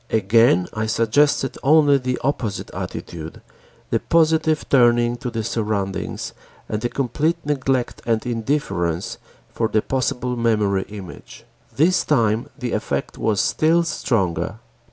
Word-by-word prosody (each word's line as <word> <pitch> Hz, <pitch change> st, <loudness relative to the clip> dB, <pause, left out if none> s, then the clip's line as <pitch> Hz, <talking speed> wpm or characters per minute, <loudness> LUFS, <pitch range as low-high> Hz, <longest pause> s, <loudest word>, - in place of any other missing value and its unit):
Again 110 Hz, -3 st, +3 dB
I 110 Hz, 0 st, -2 dB
suggested 130 Hz, +5 st, +2 dB
only 145 Hz, -1 st, +5 dB
the 125 Hz, 0 st, -2 dB
opposite 120 Hz, -6 st, -2 dB
attitude, 80 Hz, -1 st, -7 dB, 0.5 s
the -, -, +2 dB
positive 160 Hz, -2 st, +2 dB
turning 120 Hz, -2 st, +4 dB
to 125 Hz, -, -4 dB
the 115 Hz, -2 st, -3 dB
surroundings 105 Hz, -4 st, -3 dB, 0.3 s
and 105 Hz, 0 st, -3 dB
the 120 Hz, -, -1 dB
complete 145 Hz, +7 st, 0 dB
neglect 135 Hz, -3 st, -1 dB
and 115 Hz, 0 st, 0 dB
indifference 110 Hz, -, -2 dB, 0.3 s
for 115 Hz, -, 0 dB
the 110 Hz, -1 st, +1 dB
possible 125 Hz, -1 st, -1 dB
memory 105 Hz, -5 st, +1 dB
image. 100 Hz, -4 st, -10 dB, 0.3 s
This 175 Hz, +6 st, +3 dB
time 115 Hz, -5 st, +1 dB
the 125 Hz, -4 st, -4 dB
effect -, -, -3 dB
was 105 Hz, -3 st, +1 dB
still 165 Hz, +2 st, +3 dB
stronger. 95 Hz, -, -1 dB
120 Hz, 125 wpm, -21 LUFS, 105-140 Hz, 0.5 s, only